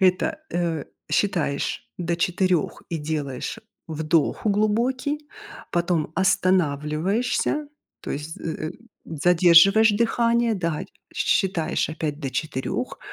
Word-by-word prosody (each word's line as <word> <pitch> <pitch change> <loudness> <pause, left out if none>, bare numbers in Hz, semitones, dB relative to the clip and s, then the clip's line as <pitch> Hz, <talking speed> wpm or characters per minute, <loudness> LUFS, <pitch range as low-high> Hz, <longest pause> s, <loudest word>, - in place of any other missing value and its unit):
это, 185 -1 +2 0.2
э, 170 -4 -1 0.3
считаешь 170 -8 0
до 170 -1 -1
4 180 -1 0
и 165 - -2
делаешь 150 - -3 0.3
вдох 160 +3 0
глубокий, 250 +8 0 0.4
потом 170 -3 0
останавливаешься, 185 - +1 0.3
то - - -7
есть 150 +3 -4
з - - -14
э 160 -1 -3
э, 175 - -7 0.3
задерживаешь 180 +6 +5
дыхание, 235 +1 +2
да, 170 -5 -2 0.3
щ - - -2
считаешь 185 -7 0
опять 155 -2 -3
до 135 -3 -3
4, 130 0 -3
175 Hz, 110 wpm, -24 LUFS, 155-205 Hz, 0.4 s, задерживаешь